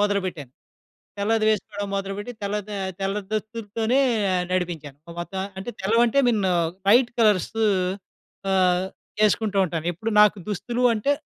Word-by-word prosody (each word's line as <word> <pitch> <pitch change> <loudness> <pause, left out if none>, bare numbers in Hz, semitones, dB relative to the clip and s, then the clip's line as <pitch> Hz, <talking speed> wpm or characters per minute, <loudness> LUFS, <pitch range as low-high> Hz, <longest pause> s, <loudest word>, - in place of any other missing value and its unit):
మొదలుపెట్టాను. 190 -9 -1 0.7
తెల్లది 215 +2 +1
వేసుకోడం 205 -1 -1
మొదలుబెట్టి, 200 +4 -4
తెల్ల 200 +1 -1
ద - - -8 0.3
తెల్ల 195 +1 -1 0.2
దుస్తులుతోనే 220 +2 -1 0.5
నడిపించాను. 165 -6 -3
ఓ - - -7
వద్దా 190 +2 -4 0.2
అంటే, 195 +5 -5
తెల్లవంటే 230 +6 +3
మిన్న్ 210 -5 +1 0.4
లైట్ 240 +3 +6
కలర్స్ 210 -5 +3 1.0
ఆహ్, 185 -1 +3 0.4
యేసుకుంటూ 210 -1 +2
ఉంటాను. 165 -2 -3
ఎప్పుడు 220 +7 -4
నాకు 210 0 +6
దుస్తులు 235 +5 -2
అంటే, 225 +7 +1
205 Hz, 125 wpm, -24 LUFS, 185-220 Hz, 1.0 s, లైట్